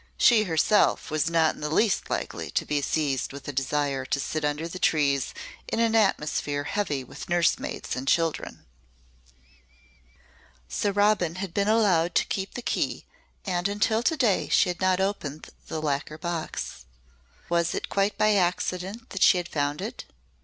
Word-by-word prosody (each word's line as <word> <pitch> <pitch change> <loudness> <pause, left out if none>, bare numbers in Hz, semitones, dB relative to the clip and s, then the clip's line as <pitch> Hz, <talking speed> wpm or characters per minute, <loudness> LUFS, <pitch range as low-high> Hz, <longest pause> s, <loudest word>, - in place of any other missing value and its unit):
She 220 -3 +5
herself 165 0 +2
was 155 +1 +1
not 165 -1 +3
in - - -13
the 150 - -2
least 195 +6 +1
likely - - -3
to - - -1
be 145 -1 0
seized 140 -2 -1
with 140 0 -10
a 145 - -4
desire 135 0 -1
to 140 - -1
sit 155 +2 -3
under 150 +2 -1
trees 150 -6 +1 0.4
in - - -2
an 230 -1 +2
atmosphere 150 -8 +1
heavy 150 -8 -2
with 125 - -10
nursemaids 175 -1 0
and 130 +2 -5
children. 165 +1 0 2.0
So 135 - -1
Robin 205 -4 +2
had 185 -2 -5
been 200 +2 +1
allowed 185 -6 +3
to - - +3
keep 195 0 -4
the 245 - -5
key - - -1 0.4
and 180 -1 0
until 210 +2 +1
to 315 +6 +1
day 225 -9 +2
she - - +4
had 175 +1 -4
not 185 0 +3
opened 175 -7 -3 0.2
the 160 - -3
lacquer 150 0 -2
box. 165 - -4 0.6
Was 170 0 +1
it - - -3
quite 200 +1 0
by 215 0 +4
accident 185 +3 -1
that 195 - -5
she 190 - +6
had 175 -1 -3
found 145 0 -1
it? - - -6
170 Hz, 165 wpm, -26 LUFS, 150-200 Hz, 2.0 s, she